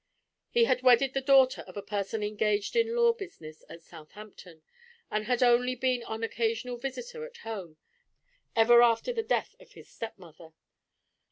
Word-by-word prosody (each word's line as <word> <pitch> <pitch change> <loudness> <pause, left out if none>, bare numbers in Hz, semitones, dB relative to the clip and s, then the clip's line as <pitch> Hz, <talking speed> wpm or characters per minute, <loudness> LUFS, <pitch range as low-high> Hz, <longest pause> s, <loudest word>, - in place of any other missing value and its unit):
He 475 - +3
had 255 - +1
wedded 255 +1 +4
the 270 - -1
daughter 265 -1 +4
of 185 - -12
a 200 - -5
person 205 +1 -3
engaged 210 - -1
in 460 0 +1
law 470 -1 +4
business 255 - -11
at 165 - -12
Southampton, 170 0 -14 0.5
and 215 0 -2
had 245 +1 +1
only 250 +1 +3
been 255 0 0
an 220 0 -5
occasional 230 +2 -2
visitor 465 - -6
at 475 0 -10
home, 190 -8 -7 0.8
ever 235 +1 +6
after 235 - +2
the 460 - -1
death 450 +1 -2
of - - -19
his - - -15
stepmother. 175 -7 -10
235 Hz, 160 wpm, -28 LUFS, 210-270 Hz, 0.8 s, ever